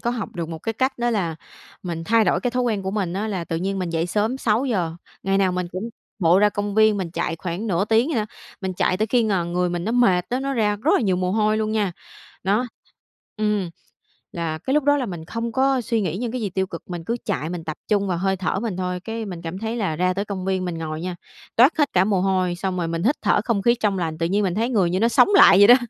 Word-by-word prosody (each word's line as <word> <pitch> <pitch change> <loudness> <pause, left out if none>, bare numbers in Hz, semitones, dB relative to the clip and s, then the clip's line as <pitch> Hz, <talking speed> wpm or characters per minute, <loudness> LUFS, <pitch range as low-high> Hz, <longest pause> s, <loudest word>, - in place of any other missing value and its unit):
có 235 - -1
học 235 -4 -3
được 165 -1 -3
một 165 -1 -6
cái 225 - -3
cách 260 +3 -1
đó 240 0 +1
là 180 -7 -1 0.5
mình 165 -2 -4
thay 225 +2 +4
đổi 175 0 +2
cái 245 - -1
thói 250 +1 0
quen 220 -5 0
của 190 - -2
mình 195 -4 -2
á. 210 +3 -2
Là 185 -4 -3
tự 165 - -3
nhiên 195 +3 -2
mình 180 -2 -2
dậy 165 +1 0
sớm 215 +7 0
6:00, 210 -9 0 0.3
ngày 195 0 +1
nào 190 -2 +2
mình 180 -1 -2
cũng 190 +5 -4 0.3
bộ 175 0 +4
ra 210 +1 +5
công 205 0 -3
viên, 215 -1 +5
mình 180 -4 -3
chạy 165 -1 -2
khoảng 180 +5 -4
nửa 190 0 +1
tiếng 225 +6 +2
vậy 300 - -1
đó. 215 - +1 0.4
Mình 190 -1 -2
chạy 185 - +1
tới 215 +2 0
khi 240 +1 +2
ng 180 -5 0
người 180 0 +1
mình 175 0 -3
nó 225 - -1
mệt 190 -8 +3
á, 250 +2 -1
nó 275 0 -2
ra 210 -4 +1
rất 210 - 0
là - - +3
nhiều 190 -5 +1
mồ 180 0 0
hôi 215 0 +2
luôn 215 0 -1
nha. 205 -5 0 0.5
Đó, 210 +6 +2 0.7
ừm, 210 -4 0 0.6
là 165 -2 -3
cái 265 - -3
lúc 300 -2 +3
đó 290 0 +4
là 260 - -1
mình 175 -5 -6
không 230 +5 -4
có 265 +1 +2
suy 230 -1 0
nghĩ 185 -2 -2
những 235 0 -3
cái 250 -2 -3
gì 205 - -1
tiêu 190 +1 -1
cực, 170 - -7
mình 175 -2 -5
cứ 235 +6 -2
chạy 170 -6 -2
mình 175 -2 -5
tập 155 -1 -5
trung 200 -2 +1
vào 180 -2 -1
hơi 190 +1 0
thở 190 +1 -1
mình 215 -5 -3
thôi. 180 -1 -2
Cái 225 +4 -5
mình 180 -4 -7
cảm 170 +2 -5
thấy 225 +1 -3
là 200 -9 -1
ra 180 +3 +1
tới 200 +2 -2
công 195 -3 -5
viên, 190 -1 0
mình 170 -2 -3
ngồi 155 -1 -4
nha, 180 0 -4 0.4
toát 255 +8 +5
hết 295 -2 +1
cả 185 0 +5
mồ 195 -3 +1
hôi, 185 -2 +1
xong 185 0 -3
rồi 170 -2 -1
mình 165 +1 -2
hít 275 +6 +3
thở - - +3
không 225 -5 +1
khí 235 +2 +4
trong 210 -5 0
lành, 160 -2 -2
tự 165 - -1
nhiên 200 +4 +1
mình 180 -1 0
thấy 230 +3 0
người 195 -8 +2
như 185 +2 0
nó 230 - +4
sống 240 - +5
lại 195 - +8
vậy 205 +1 +8
đó. 245 - +10
195 Hz, 285 wpm, -22 LUFS, 180-225 Hz, 0.7 s, đó